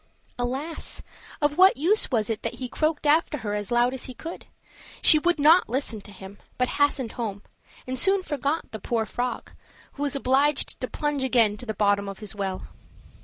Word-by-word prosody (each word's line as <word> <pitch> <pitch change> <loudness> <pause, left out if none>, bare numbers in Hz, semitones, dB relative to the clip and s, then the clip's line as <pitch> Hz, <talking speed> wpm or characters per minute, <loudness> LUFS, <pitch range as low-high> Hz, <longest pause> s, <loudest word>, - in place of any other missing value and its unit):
Alas! 270 +7 -3 0.4
of 295 +3 +1
what 380 -4 +7
use 365 +10 +2
was 225 -5 +1
it 225 -2 -3
that 230 - -4
he 255 - -5
croaked 310 +4 -1
after 300 +1 +3
her 205 - -2
as 205 -1 -3
loud 240 +1 +3
as 260 - -5
he 255 - -8
could. 330 +6 -8 0.6
She 310 - +8
would 350 +2 +1
not 310 +2 +5
listen 240 -3 -1
to 205 - -13
him, 195 +1 -12 0.2
but 250 0 +1
hastened 280 -5 +2
home, 205 -4 -5 0.4
and 255 0 -3
soon 385 +5 +3
forgot 290 0 -2
the 220 - -6
poor 225 +2 -1
frog, 245 +2 -4 0.4
who 285 - -9
was 290 0 0
obliged 275 +2 +1
to 255 - -2
plunge 295 -1 -2
again 235 -5 +3
to 245 - -10
the 220 - -3
bottom 200 -1 +1
of 195 - -7
his 210 -1 -5
well. 195 -2 -4
255 Hz, 195 wpm, -25 LUFS, 220-295 Hz, 0.6 s, She